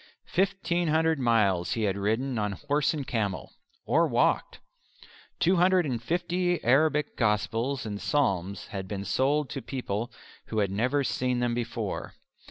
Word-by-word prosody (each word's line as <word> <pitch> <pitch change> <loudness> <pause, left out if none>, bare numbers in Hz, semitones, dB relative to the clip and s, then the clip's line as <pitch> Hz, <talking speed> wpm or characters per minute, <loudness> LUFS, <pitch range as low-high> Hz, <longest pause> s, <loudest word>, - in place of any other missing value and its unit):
Fifteen 175 -2 +1
hundred 160 0 +2
miles 105 -8 +2
he 115 - -1
had 100 -2 +1
ridden 110 +5 -1
on 105 -1 -1
horse 145 +8 0
and 150 -4 -4
camel, 105 -7 -2 0.3
or - - +3
walked. - - +1 0.8
Two 185 +2 +3
hundred 180 0 +4
and 125 -5 -2
fifty 175 +5 0
Arabic 150 +4 +2
Gospels 115 +4 0
and 105 -1 -5
Psalms 100 - 0
had 95 -1 -5
been 100 0 -4
sold 140 +5 +1
to 135 - -4
people 120 -3 -4 0.4
who 110 - -4
had 100 -3 +1
never 125 +8 +1
seen 125 -1 0
them 120 -1 0
before. 115 -3 -4
125 Hz, 150 wpm, -28 LUFS, 105-150 Hz, 0.8 s, hundred